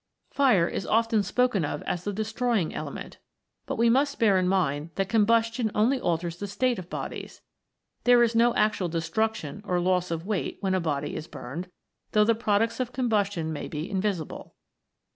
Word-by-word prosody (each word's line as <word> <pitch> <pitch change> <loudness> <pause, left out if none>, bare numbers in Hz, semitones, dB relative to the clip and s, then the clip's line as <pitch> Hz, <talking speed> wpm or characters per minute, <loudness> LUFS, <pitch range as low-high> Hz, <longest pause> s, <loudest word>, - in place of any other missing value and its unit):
Fire 235 -12 +4
is 190 - -4
often 225 -1 +2
spoken 210 0 +1
of 145 0 -3
as 180 0 -3
the 205 - -1
destroying 220 -2 -1
element, - - -7 0.5
but - - -2
we 235 - +4
must 275 +4 +2
bear 205 -5 +4
in 180 - +1
mind 160 -5 0
that 195 0 -1
combustion 230 +2 +2
only 245 +5 +2
alters 170 0 -1
the 205 - -5
state 245 +3 0
of 180 -1 -9
bodies; - - -6 0.6
there 245 -1 +6
is 235 -1 +2
no 235 +1 +4
actual 205 -4 +1
de 165 0 -1
struction 205 -1 -2
or 180 -3 0
loss 180 0 +1
of 165 0 -3
weight 205 -2 -2
when 190 -2 0
a 185 - +2
body 150 -4 -2
is 160 - -6
burned, 165 +9 -7 0.4
though 210 0 +5
the 230 - +4
products 225 +1 0
of 250 -1 -2
combustion 205 -10 0
may 150 - -5
be 155 +2 -4
invi 195 -1 0
sible. 155 - -9
205 Hz, 185 wpm, -27 LUFS, 175-230 Hz, 0.6 s, there